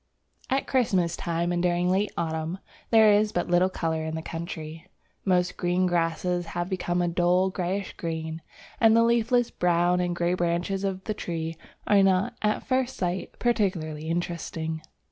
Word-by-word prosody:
AT 270 +1 +1
Christmas 190 -10 +1
time 170 0 -1
and 175 0 0
during 175 0 +1
late 200 +3 +1
autumn, 160 +1 -2 0.3
there 220 -2 +6
is 210 +1 +3
but 175 - -2
little 175 +1 +4
colour 160 -3 -2
in 160 0 -3
the 160 - -4
country. 165 0 -6 0.4
Most 180 -2 +1
green 180 +1 +1
grasses 175 0 0
have 175 +1 -1
become 175 -1 0
a - - +1
dull 180 +2 +2
greyish 185 +2 -3
green, 160 -1 -4 0.4
and 225 -1 +6
the 230 - +6
leafless 235 +1 +2
brown 175 0 +2
and 175 -1 0
grey 175 +1 +1
branches 175 +2 -1
of 190 -1 -2
the 215 - -2
trees 165 -4 -4 0.3
are 205 -1 +5
not, 190 0 +2
at 210 0 0
first 260 -1 0
sight, 180 0 -3
particularly 170 -10 -1
interesting. 165 -2 -3
175 Hz, 165 wpm, -26 LUFS, 170-195 Hz, 0.4 s, there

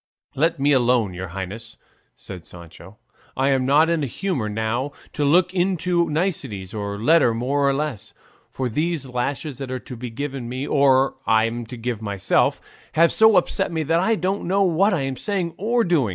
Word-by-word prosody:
"Let 160 +2 +1
me 145 +2 +2
alone, 120 -6 +2
your 95 +1 -6
highness," 100 +5 -7 0.4
said 90 -4 -9
Sancho. 85 +3 -13 0.4
"I'm 135 -1 +2
not 150 +4 +5
in 170 -1 0
a 140 - -1
humour 135 - -2
now 110 +6 -2 0.2
to 150 - -1
look 175 +5 +3
into 180 -2 +1
niceties 150 - -2
or 100 -1 -4
a - - -7
letter 125 0 +3
more 140 +4 +1
or - - +3
less, 145 -7 -4 0.4
for 130 - -3
these 155 +4 -1
lashes 130 +3 -3
that 135 -2 -5
are 130 - -3
to 125 - -9
be 125 +1 -6
given 135 0 -5
me, 130 +3 -4
or 135 -2 +3
I'm 115 +1 +1
to 125 - -8
give 115 -1 -4
myself, 100 -2 +1 0.3
have 170 +1 +4
so 220 -1 +5
upset 190 +1 +1
me, 160 -1 -1
that 165 +3 +1
I 225 +5 +2
don't 195 0 -2
know 195 +2 +2
what 190 +3 +3
I'm 135 -6 -2
saying 190 -5 -2
or 235 +4 +1
doing. 165 - +1
135 Hz, 185 wpm, -22 LUFS, 115-170 Hz, 0.4 s, not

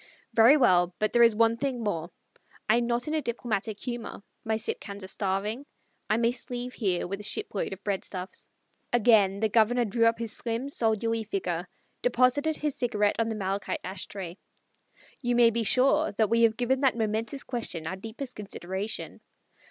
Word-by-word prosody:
"Very 230 +6 +7
well. 180 -9 +3
But 215 - 0
there 240 - +5
is 230 -2 +6
one 230 +1 +3
thing 260 -3 -2
more. 170 -5 -2 0.6
I 220 +2 +4
am 240 0 0
not 240 +4 0
in 305 - -2
a 315 - +1
diplomatic 225 -4 -3
humor. 240 -4 -6 0.2
My 220 -1 0
Sitkans 205 -2 -4
are - - -7
starving. 200 +6 -2 0.5
I 215 - +3
must 235 +1 -1
leave 245 0 -4
here 190 -6 0
with 195 +2 -4
a - - -8
shipload 205 -1 -2
of 195 +1 -8
breadstuffs." 190 -2 -4 0.4
Again 210 -4 +4
the 220 - +3
Governor 235 +3 +3
drew 230 +2 +2
up 230 - +2
his 230 -2 -4
slim 235 +3 -3
soldierly 225 -2 0
figure; 395 - -3 0.3
deposited 290 - +2
his 300 -2 -2
cigarette 215 -6 +1
on 230 - +2
the 225 - -2
malachite 195 -1 -2
ash 185 +2 -3
tray. 185 -3 -7 0.8
"You 245 -2 0
may 235 -1 +6
be 235 +1 0
sure 255 +5 +3
that 215 0 +1
we 230 0 +4
have 225 -1 +4
given 260 +2 +1
that 265 -4 +3
momentous 225 +4 -2
question 225 -10 -4
our 180 - -3
deepest 225 +6 -7
consideration. 200 +1 -5
225 Hz, 180 wpm, -28 LUFS, 205-245 Hz, 0.8 s, Very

